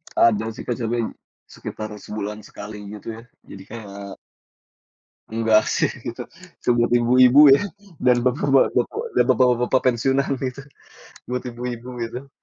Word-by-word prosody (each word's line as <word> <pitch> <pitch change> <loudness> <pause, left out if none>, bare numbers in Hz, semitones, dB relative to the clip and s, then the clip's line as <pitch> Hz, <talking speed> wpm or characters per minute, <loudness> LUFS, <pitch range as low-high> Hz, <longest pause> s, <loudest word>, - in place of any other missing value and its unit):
Ada 110 0 +3
sih, - - -9
Kak, 120 - -3
sering, 115 -1 -1 0.4
sekitar 110 0 -7
sebulan 105 0 -6
sekali 105 0 -9
gitu 105 +2 -8
ya, - - -10 0.2
jadi 95 -1 -11
kayak 100 -3 -9 1.2
Enggak 110 -1 +3
sih - - +2 0.2
gitu. - - -5 0.4
Itu - - -21
buat 120 0 +2
ibu-ibu 125 +3 +5 0.2
ya - - -1 0.4
dan 125 -1 +5
bapak-bapak 130 -1 +3 0.3
dan 125 - +5
bapak-bapak 125 0 +3
pensiunan 135 +3 +1
gitu. 130 +1 -4 0.7
Buat 125 0 -2
ibu-ibu 120 0 -6 0.2
gitu. 125 +4 -7
120 Hz, 130 wpm, -22 LUFS, 110-125 Hz, 1.2 s, ibu-ibu